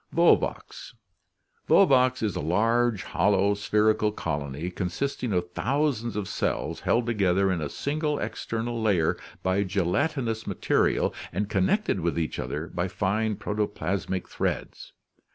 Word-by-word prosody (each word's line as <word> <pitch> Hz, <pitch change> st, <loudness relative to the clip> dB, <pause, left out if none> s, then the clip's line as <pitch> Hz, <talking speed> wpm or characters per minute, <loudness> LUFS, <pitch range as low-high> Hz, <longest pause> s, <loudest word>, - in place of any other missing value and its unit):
Volvox, -, -, +1 dB, 0.3 s
— -, -, -40 dB
Volvox 130 Hz, -1 st, +5 dB
(Fig. -, -, -8 dB
28) -, -, -3 dB
is 105 Hz, -3 st, 0 dB
a -, -, -2 dB
large 115 Hz, +6 st, +1 dB
hol 105 Hz, -, +1 dB
low 100 Hz, +1 st, +3 dB
spherical 105 Hz, +1 st, +2 dB
colony 75 Hz, -2 st, -4 dB
consisting 110 Hz, +8 st, -3 dB
of 90 Hz, -2 st, -1 dB
thousands: 130 Hz, -1 st, 0 dB
of 105 Hz, -2 st, -2 dB
cells -, -, -2 dB
held 120 Hz, 0 st, +1 dB
together 100 Hz, -4 st, +2 dB
in 90 Hz, -3 st, -1 dB
a 75 Hz, -, -3 dB
single 150 Hz, -, -1 dB
external 115 Hz, +1 st, -3 dB
layer 95 Hz, -7 st, +2 dB, 0.3 s
by 95 Hz, +2 st, +2 dB
gelatinous 110 Hz, -, -1 dB
material -, -, +1 dB, 0.2 s
and 100 Hz, +3 st, -2 dB
connected 100 Hz, -, +1 dB
with 85 Hz, -1 st, -1 dB
each 80 Hz, -2 st, -2 dB
other 75 Hz, +2 st, -3 dB
by 90 Hz, +1 st, -3 dB
fine 105 Hz, +4 st, 0 dB
protoplasmic 100 Hz, -3 st, -2 dB
threads. -, -, -4 dB
105 Hz, 140 wpm, -26 LUFS, 90-120 Hz, 0.3 s, Volvox